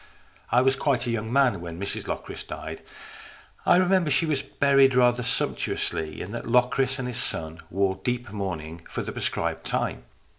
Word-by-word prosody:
I 125 Hz, -, +5 dB
was 135 Hz, 0 st, +4 dB
quite 135 Hz, -3 st, +1 dB
a 120 Hz, -, -1 dB
young 110 Hz, -1 st, -2 dB
man 130 Hz, -8 st, +3 dB
when 85 Hz, -1 st, -7 dB
Mrs 100 Hz, -, -4 dB
Locris -, -, -5 dB
died. -, -, -7 dB, 0.9 s
I -, -, +7 dB
remember 185 Hz, -2 st, +3 dB
she 145 Hz, +4 st, +3 dB
was 150 Hz, -4 st, 0 dB
buried 135 Hz, -2 st, +3 dB
rather 125 Hz, -1 st, +4 dB
sumptuously, 80 Hz, -9 st, -1 dB
and 100 Hz, -, -8 dB
that 120 Hz, -, -5 dB
Locris 125 Hz, +2 st, +2 dB
and 130 Hz, -2 st, -3 dB
his 125 Hz, 0 st, 0 dB
son 80 Hz, -8 st, -3 dB
wore 95 Hz, 0 st, 0 dB
deep 120 Hz, -3 st, -2 dB
mourning 85 Hz, -5 st, -5 dB
for -, -, -3 dB
the -, -, -5 dB
prescribed -, -, -2 dB
time. -, -, -2 dB
125 Hz, 175 wpm, -26 LUFS, 100-135 Hz, 0.9 s, I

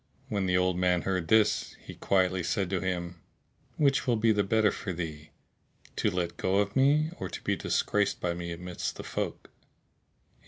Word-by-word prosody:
When 100 Hz, -3 st, -1 dB
the 90 Hz, 0 st, +3 dB
old 90 Hz, -1 st, +1 dB
man 90 Hz, -1 st, +2 dB
heard 95 Hz, -3 st, -1 dB
this, 110 Hz, +1 st, +3 dB
he -, -, -10 dB
quietly 95 Hz, -1 st, +1 dB
said 95 Hz, +2 st, -1 dB
to 95 Hz, -, +1 dB
him, 90 Hz, -2 st, -3 dB, 0.6 s
"Which 140 Hz, -3 st, +2 dB
will 120 Hz, -, +3 dB
be 110 Hz, 0 st, +3 dB
the 105 Hz, -1 st, +2 dB
better 110 Hz, +2 st, +3 dB
for 95 Hz, -, -5 dB
thee, 80 Hz, -3 st, -6 dB, 0.7 s
to -, -, +2 dB
let 90 Hz, -3 st, -2 dB
go 95 Hz, -, 0 dB
of 100 Hz, 0 st, +1 dB
me 145 Hz, +4 st, +3 dB
or -, -, -4 dB
to -, -, -7 dB
be -, -, +1 dB
disgraced 105 Hz, -1 st, 0 dB
by 85 Hz, -1 st, -1 dB
me 85 Hz, 0 st, -5 dB
amidst 90 Hz, +1 st, -5 dB
the -, -, -7 dB
folk?" -, -, -4 dB
95 Hz, 185 wpm, -29 LUFS, 90-105 Hz, 0.7 s, the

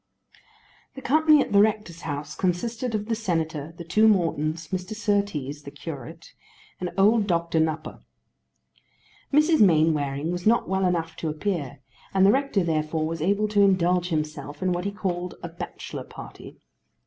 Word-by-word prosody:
The 270 Hz, -, -8 dB
company 310 Hz, +2 st, +5 dB
at -, -, -3 dB
the 200 Hz, 0 st, +6 dB
rector's 210 Hz, -6 st, 0 dB
house 145 Hz, -1 st, -5 dB
consisted 225 Hz, +6 st, -1 dB
of 210 Hz, -1 st, -2 dB
the 230 Hz, -, -1 dB
Senator, 165 Hz, -7 st, -2 dB
the 170 Hz, -, -7 dB
two 215 Hz, +7 st, +3 dB
Mortons, 165 Hz, -5 st, +1 dB
Mr. 185 Hz, +3 st, -4 dB
Surtees 200 Hz, -10 st, -1 dB
the 140 Hz, -, -9 dB
curate, 145 Hz, -3 st, -9 dB, 0.5 s
and 180 Hz, -, -2 dB
old 210 Hz, +2 st, +4 dB
Doctor 170 Hz, -2 st, +1 dB
Nupper. 160 Hz, 0 st, -2 dB, 1.3 s
Mrs. 305 Hz, +2 st, +4 dB
Mainwaring 155 Hz, -4 st, +3 dB
was 180 Hz, +2 st, -2 dB
not 235 Hz, +2 st, +3 dB
well 190 Hz, 0 st, +1 dB
enough 165 Hz, -2 st, -1 dB
to 160 Hz, -, -3 dB
appear, 155 Hz, -4 st, -3 dB, 0.3 s
and 190 Hz, 0 st, +5 dB
the 200 Hz, -, +7 dB
rector 270 Hz, -6 st, +1 dB
therefore 155 Hz, -1 st, -1 dB
was 165 Hz, 0 st, -4 dB
able 200 Hz, +5 st, +1 dB
to 205 Hz, -1 st, +3 dB
indulge 180 Hz, -2 st, +3 dB
himself 150 Hz, -1 st, -4 dB
in 185 Hz, -, +1 dB
what 175 Hz, +1 st, -2 dB
he 200 Hz, -, -1 dB
called 180 Hz, -3 st, -3 dB
a -, -, -3 dB
bachelor 165 Hz, -, -7 dB
party. -, -, -11 dB
175 Hz, 160 wpm, -25 LUFS, 155-205 Hz, 1.3 s, the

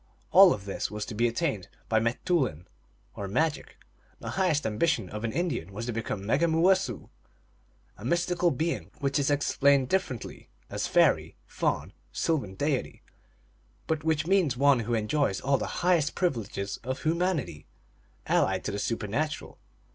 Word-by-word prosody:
All 190 Hz, -1 st, +9 dB
of 100 Hz, -8 st, -3 dB
this 100 Hz, -, -3 dB
was 105 Hz, 0 st, -4 dB
to -, -, -7 dB
be 120 Hz, +3 st, +2 dB
attained 120 Hz, -, -2 dB, 0.2 s
by 110 Hz, -, +2 dB
m 110 Hz, -, +2 dB
te 125 Hz, +9 st, -2 dB
oulin, 125 Hz, -, 0 dB, 0.5 s
or 100 Hz, -, -5 dB
magic. 155 Hz, +10 st, -1 dB, 0.4 s
The -, -, -6 dB
highest 180 Hz, -6 st, +1 dB
ambition 110 Hz, -, 0 dB
of 105 Hz, +1 st, -5 dB
an 115 Hz, -, -1 dB
Indian 165 Hz, -, -2 dB
was 110 Hz, +4 st, -5 dB
to 120 Hz, -, -2 dB
become 110 Hz, -3 st, -3 dB
a -, -, -8 dB
Megumooicessoo, 165 Hz, -, +2 dB, 0.9 s
a -, -, -10 dB
mystical 175 Hz, +5 st, +1 dB
being, 165 Hz, +3 st, -2 dB
which 140 Hz, 0 st, 0 dB
is 140 Hz, -, +1 dB
explained 140 Hz, -2 st, +3 dB
differently 185 Hz, -, -3 dB, 0.2 s
as -, -, -2 dB
fairy, -, -, +3 dB
faun, -, -, -2 dB, 0.2 s
sylvan 130 Hz, -, -1 dB
deity, 140 Hz, +4 st, -2 dB, 0.8 s
but 160 Hz, -2 st, -1 dB
which 160 Hz, -1 st, +1 dB
means 175 Hz, -9 st, +2 dB
one 140 Hz, -1 st, +4 dB
who 115 Hz, +1 st, -1 dB
enjoys 110 Hz, -1 st, 0 dB
all 140 Hz, 0 st, +1 dB
the -, -, -3 dB, 0.2 s
high 180 Hz, 0 st, +5 dB
est 150 Hz, -1 st, -2 dB
privileges 110 Hz, -, -2 dB
of 130 Hz, +1 st, -5 dB
humanity 155 Hz, -, -1 dB, 0.6 s
allied 95 Hz, -1 st, +1 dB
to -, -, -3 dB
the 100 Hz, -, -3 dB
supernatural. 115 Hz, +8 st, -3 dB
135 Hz, 160 wpm, -28 LUFS, 105-160 Hz, 0.9 s, All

